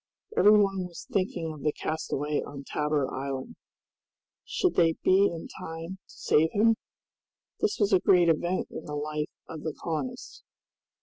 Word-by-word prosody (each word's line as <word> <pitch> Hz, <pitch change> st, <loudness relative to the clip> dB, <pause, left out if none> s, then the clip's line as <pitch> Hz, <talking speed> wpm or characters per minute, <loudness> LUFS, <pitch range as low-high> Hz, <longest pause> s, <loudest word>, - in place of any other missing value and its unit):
Every 210 Hz, -, +7 dB
one 195 Hz, -2 st, +1 dB
was 170 Hz, -, -10 dB
thinking 180 Hz, -5 st, -1 dB
of 150 Hz, -, -11 dB
the 150 Hz, -, +2 dB
castaway 150 Hz, -1 st, -2 dB
on 140 Hz, -1 st, -8 dB
Tabor 150 Hz, -1 st, 0 dB
Island. 135 Hz, 0 st, -4 dB, 0.9 s
Should 370 Hz, -, 0 dB
they 165 Hz, -2 st, +4 dB
be 195 Hz, +2 st, +5 dB
in 165 Hz, -1 st, -5 dB
time 165 Hz, +3 st, -7 dB
to -, -, -16 dB
save 160 Hz, +2 st, +3 dB
him? 225 Hz, +2 st, +4 dB, 0.8 s
This 425 Hz, -1 st, +1 dB
was 205 Hz, -1 st, +2 dB
a 190 Hz, -, +7 dB
great 175 Hz, -1 st, +5 dB
event 175 Hz, +3 st, +1 dB
in -, -, -7 dB
the 150 Hz, -, -5 dB
life 150 Hz, +1 st, -2 dB, 0.2 s
of 160 Hz, -2 st, -7 dB
the 155 Hz, -1 st, -4 dB
colonists! 150 Hz, -6 st, -4 dB
165 Hz, 160 wpm, -28 LUFS, 150-185 Hz, 0.9 s, Every